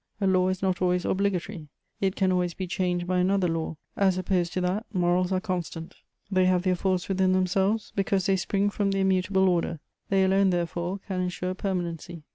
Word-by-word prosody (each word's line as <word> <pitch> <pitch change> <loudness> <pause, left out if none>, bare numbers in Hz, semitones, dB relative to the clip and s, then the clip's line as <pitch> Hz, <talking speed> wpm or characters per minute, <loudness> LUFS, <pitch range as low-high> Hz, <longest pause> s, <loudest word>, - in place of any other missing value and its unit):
A 200 - 0
law 185 -1 +3
is 185 0 -2
not 185 -1 0
always 180 -1 +1
obligatory; 190 -3 -1 0.3
it 195 -1 0
can 190 -1 +2
always 180 -2 0
be 190 - -3
changed 180 0 -1
by 180 0 0
another 185 0 +2
law: 165 -1 -3 0.2
as 190 -2 +2
opposed 180 -2 0
to 185 - -1
that, 185 +4 0
morals 180 -1 +1
are 185 - +2
constant; 175 -4 -4 0.4
they 185 -1 +3
have 180 -1 +2
their 185 -1 +2
force 185 0 -1
within 190 -1 +2
themselves, 190 +4 +1
because 195 -2 +1
they 195 - +3
spring 200 +2 0
from 205 -1 0
the 195 - 0
immutable 190 0 +2
order: 170 -2 0 0.3
they 195 -1 +3
alone, 190 +1 +3
therefore, 175 +1 -2
can 185 -2 -2
ensure 180 0 -2
permanency. 175 -4 -4
185 Hz, 195 wpm, -26 LUFS, 180-190 Hz, 0.4 s, law